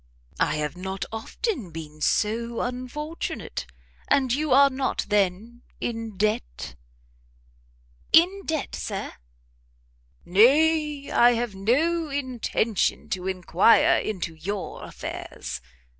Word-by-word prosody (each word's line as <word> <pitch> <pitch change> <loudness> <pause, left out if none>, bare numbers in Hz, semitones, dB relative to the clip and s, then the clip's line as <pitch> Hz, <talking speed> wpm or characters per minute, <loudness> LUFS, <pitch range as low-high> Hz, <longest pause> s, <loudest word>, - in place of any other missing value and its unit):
I - - +2
have 150 0 -2
not 190 +1 -4
often 225 - -3
been 155 -2 -9
so 230 +5 0
unfortunate; 255 +6 -4 0.4
and 265 -4 +3
you 300 +1 -1
are 275 +2 +7
not, 260 0 -1
then, 210 +4 0 0.2
in 225 -3 -4
debt?" 190 - -1 1.4
"In 370 +4 +5
debt, 315 -3 -2
Sir?" - - -4 1.1
"Nay, 295 - +4
I 240 0 +6
have 235 -2 -2
no 300 - +1
intention 250 -6 -1
to 185 -4 -3
inquire 185 +3 +4
into 185 -6 -3
your 190 +5 -5
affairs. - - -6
230 Hz, 100 wpm, -25 LUFS, 190-280 Hz, 1.4 s, are